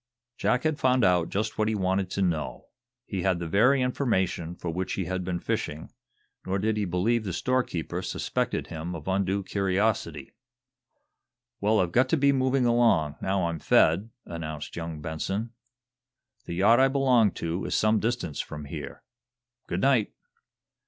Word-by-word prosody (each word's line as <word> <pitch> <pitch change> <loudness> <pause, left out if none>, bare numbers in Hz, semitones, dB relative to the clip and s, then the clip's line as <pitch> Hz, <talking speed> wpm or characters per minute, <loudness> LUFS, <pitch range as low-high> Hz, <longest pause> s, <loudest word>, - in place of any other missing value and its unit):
Jack 125 +1 +1
had 155 -2 0
found 130 -2 +3
out 90 -2 +3
just 110 +2 -2
what 105 - +2
he 110 - 0
wanted 95 -1 0
to 100 - -1
know. 75 -9 -2 0.4
He 95 -3 -3
had 95 -1 +1
the 85 - -4
very 125 +10 +4
information 95 - -1
for 85 -1 -4
which 90 +3 -3
he 95 - -2
had 90 +1 -2
been 90 -1 -2
fishing, 75 -1 -3 0.5
nor 95 +1 -1
did 110 +2 0
he 105 -1 0
believe 100 +6 +1
the 95 - -3
storekeeper 125 -4 -1
suspected - - -2
him 80 +2 -5
of 80 0 -9
undue 95 +1 0
curiosity. 100 +3 -1 1.3
"Well, 105 +1 +2
I've 90 -2 +1
got 130 +7 +3
to 165 - +3
be 140 0 +4
moving 130 -1 +2
along, 115 -11 +3
now 95 -2 0
I'm 85 -1 -2
fed," 90 +10 +3 0.2
announced 80 -3 -6
young 80 -2 -5
Benson. 95 +8 -3 0.9
"The 85 - -5
yacht 105 +7 +5
I 135 - +6
belong 130 -5 +3
to 85 +3 -3
is - - -1
some 110 0 +3
distance 115 - -2
from 75 0 -5
here. 70 - -7 0.6
Good - - -2
night!" 130 -6 +2
95 Hz, 165 wpm, -27 LUFS, 85-115 Hz, 1.3 s, I